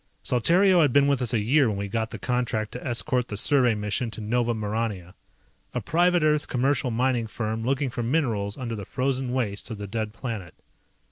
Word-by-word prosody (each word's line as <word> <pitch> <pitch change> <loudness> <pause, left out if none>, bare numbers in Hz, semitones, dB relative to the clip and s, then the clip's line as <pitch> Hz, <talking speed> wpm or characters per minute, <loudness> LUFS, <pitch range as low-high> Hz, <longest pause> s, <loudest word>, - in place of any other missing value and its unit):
Saltario 175 - +4
had 145 -4 +3
been 140 +2 +4
with 140 -2 +1
us 120 -2 0
a 120 - +2
year 130 +6 +3
when 105 - -2
we 100 0 -3
got 110 +2 -2
the - - -7
contract 120 -4 -1
to 125 - -7
escort 125 0 0
the 105 - -5
survey 125 -1 +3
mission 105 +3 -2
to 110 - -7
Nova 120 +2 0
Maurania. 105 -4 -3 0.6
A - - +1
private 175 +1 +2
Earth 150 -1 +2
commercial 130 0 +1
mining 120 0 0
firm 110 0 -3
looking 135 +1 0
for 120 - -3
minerals 115 -6 -1
under 120 -4 -4
the 100 - -6
frozen 130 +3 -2
wastes 110 -5 -2
of 110 - -5
the 100 - -6
dead 110 +1 -3
planet. 110 - -6
120 Hz, 200 wpm, -25 LUFS, 110-130 Hz, 0.6 s, Saltario